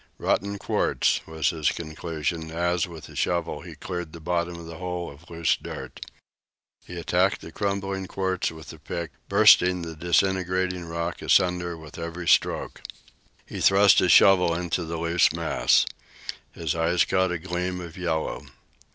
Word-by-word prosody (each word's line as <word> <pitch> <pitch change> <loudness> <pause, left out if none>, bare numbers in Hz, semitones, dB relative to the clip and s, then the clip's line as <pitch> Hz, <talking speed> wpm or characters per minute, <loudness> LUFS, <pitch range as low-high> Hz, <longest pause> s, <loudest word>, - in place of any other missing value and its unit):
"Rotten 100 +1 0
quartz," - - +1
was 80 +2 0
his 80 -3 0
conclusion 80 0 -4
as, 85 +2 0
with 80 -3 -10
the - - -12
shovel, 85 -1 -1
he - - -10
cleared 90 -4 -6
the 85 - -9
bottom 85 +1 -2
of 85 0 -9
the 85 0 -9
hole 90 -1 -4
of 75 +4 -17
loose 85 -1 +1
dirt. - - -8 0.8
He 90 0 -8
attacked 90 +3 +1
the 80 - -10
crumbling 95 0 -2
quartz 95 -1 -1
with 80 0 -11
the 80 - -10
pick, 85 +2 -5 0.2
bursting 90 -1 +5
the 80 -1 -6
disintegrating 90 +1 0
rock 85 0 -4
asunder 90 -2 +2
with 80 0 -11
every 85 +1 -5
stroke. - - +2 0.6
He - - -7
thrust 95 0 +6
his 90 - +3
shovel 90 -3 +6
into 85 0 -2
the 85 +1 -4
loose 85 +1 +3
mass. - - +2 0.7
His 80 -3 -3
eye 85 +2 0
caught 95 -1 +1
a 90 - -1
gleam 90 +1 -3
of 85 -2 -9
yellow. 85 -4 -3
85 Hz, 160 wpm, -25 LUFS, 80-90 Hz, 0.8 s, thrust